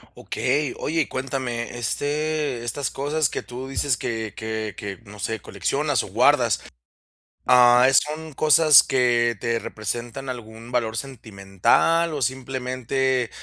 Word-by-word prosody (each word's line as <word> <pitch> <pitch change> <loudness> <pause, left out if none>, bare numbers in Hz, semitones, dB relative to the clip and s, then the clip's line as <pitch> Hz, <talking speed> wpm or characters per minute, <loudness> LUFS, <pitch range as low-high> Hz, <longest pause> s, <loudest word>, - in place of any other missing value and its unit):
Okey. 140 +1 -1
Oye, 160 -1 0
cuéntame, 130 -3 -4
este, 145 +1 -2
estas 120 +3 -3
cosas 145 0 -1
que - - -4
tú 125 +2 -8
dices 135 -2 0
que 110 -2 -4
que 110 -2 -4
que, 100 -1 -6
no 105 +1 -12
sé, 110 +1 -3
coleccionas - - -1
o - - -8
guardas, - - +3 0.8
ah, 125 0 +6
¿son 155 +3 +1
cosas 155 0 +6
que 120 -3 +2
te 115 -1 -1
representan 120 +5 -5
algún 115 -1 -8
valor 115 -2 -1
sentimental 120 - 0
o 145 - -4
simplemente 130 0 -1
125 Hz, 125 wpm, -23 LUFS, 115-140 Hz, 0.8 s, ah